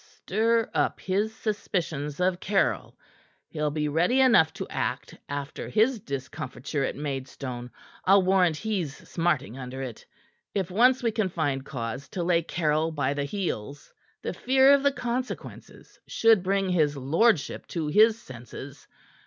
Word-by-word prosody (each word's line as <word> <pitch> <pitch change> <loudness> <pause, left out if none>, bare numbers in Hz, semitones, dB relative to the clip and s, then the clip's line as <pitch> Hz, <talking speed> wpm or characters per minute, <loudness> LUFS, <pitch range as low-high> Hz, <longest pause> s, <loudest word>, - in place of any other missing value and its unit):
"Stir 225 +3 0
up - - 0
his 200 +3 0
suspicions 170 -9 -3
of 180 0 +1
Caryll. 195 0 0 0.5
He'll 150 -1 -1
be 150 0 -1
ready 175 - +2
enough 230 -12 +5
to - - -6
act - - -3
after 140 +1 -5
his 225 +3 +2
discomfiture 140 - -4
at - - -2
Maidstone. 135 -3 -5 0.3
I'll 195 +1 +5
warrant 180 -4 +3
he's 185 -8 -2
smarting 165 -7 -1
under 130 +1 -6
it. 120 -4 -7 0.5
If 190 -3 -1
once 250 +6 +4
we 230 - +2
can 215 -3 0
find 145 -6 -1
cause 130 0 -5
to 180 - -3
lay 170 -1 +3
Caryll 160 -1 0
by 140 -3 0
the 145 0 -2
heels, 145 - -4 0.3
the - - -3
fear 265 +2 +5
of 280 - +4
the 280 0 +3
consequences 250 -1 -6
should 225 -4 +4
bring 195 +1 0
his 150 -5 +2
lordship 155 - +1
to 165 -3 -3
his 215 +8 +4
senses. 130 +3 -10
170 Hz, 145 wpm, -27 LUFS, 140-210 Hz, 0.5 s, enough